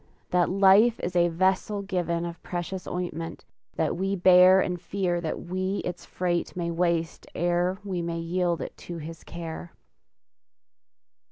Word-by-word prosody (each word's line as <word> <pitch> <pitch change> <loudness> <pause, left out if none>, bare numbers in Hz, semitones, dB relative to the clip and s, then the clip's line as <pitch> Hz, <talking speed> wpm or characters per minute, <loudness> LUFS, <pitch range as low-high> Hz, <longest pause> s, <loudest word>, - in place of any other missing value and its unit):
That 180 -1 +3
life 200 +5 +5
is 180 +1 -3
as 175 0 +5
a - - -1
vessel 190 +4 0
given 175 -3 -1
Of 170 -1 -7
precious 180 +1 -5
ointment, 175 -2 -4 0.3
that - - 0
we 195 +3 -1
bear 185 0 +7
And 180 -2 -1
fear 180 -3 -1
that 160 - -3
we 185 +2 -2
its 180 -1 -5
freight 175 -1 -2
may 170 -1 -2
waste 170 -1 -1
Ere 175 +2 +1
we 185 -3 -3
may 170 0 -3
yield 170 0 -1
it - - -6
to 175 - -7
His 165 +1 -8
care! 170 0 -7
175 Hz, 155 wpm, -26 LUFS, 170-185 Hz, 0.3 s, bear